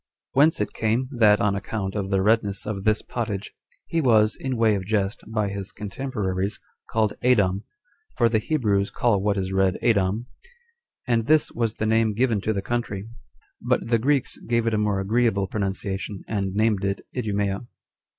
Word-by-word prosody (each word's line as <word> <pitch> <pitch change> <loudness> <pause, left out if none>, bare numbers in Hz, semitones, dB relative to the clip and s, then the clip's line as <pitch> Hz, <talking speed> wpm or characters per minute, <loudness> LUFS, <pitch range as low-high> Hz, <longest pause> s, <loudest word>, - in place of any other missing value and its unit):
Whence 150 +4 +4
it 105 - -2
came, 115 +4 0
that, 110 -5 +4
on 105 -3 +2
account 100 0 -3
of 100 -2 -3
the 95 -1 +1
redness 105 -2 +1
of 100 -2 -4
this 110 0 +2
pottage, 105 -4 -4 0.3
he 165 - 0
was, 110 -5 +4
in 130 -2 -3
way 115 -2 +4
of 100 -2 -1
jest, 100 0 -1
by 110 -2 -1
his 100 -1 -6
contemporaries, 100 -3 -3 0.3
called 110 -2 +1
Adom, 100 -6 +3 0.5
for 120 - +4
the 110 -1 +2
Hebrews 105 -7 +1
call 110 -5 +1
what 100 0 +1
is 95 0 -2
red 95 -1 +2
Adom; 105 0 +2 0.8
and 115 -2 +1
this 155 -1 +3
was 115 -2 -1
the 110 - -2
name 110 -1 +2
given 115 -3 +1
to 110 - 0
the 100 -2 -2
country; 110 -3 -3 0.5
but - - 0
the 115 -1 +3
Greeks 135 +2 +1
gave 115 -1 +1
it 115 - +1
a - - +2
more 105 -2 +1
agreeable 105 0 +1
pronunciation, 95 0 -3
and 100 -3 -2
named 105 -2 +2
it 100 0 -1
Idumea. 105 -2 -1
105 Hz, 175 wpm, -24 LUFS, 100-115 Hz, 0.8 s, Whence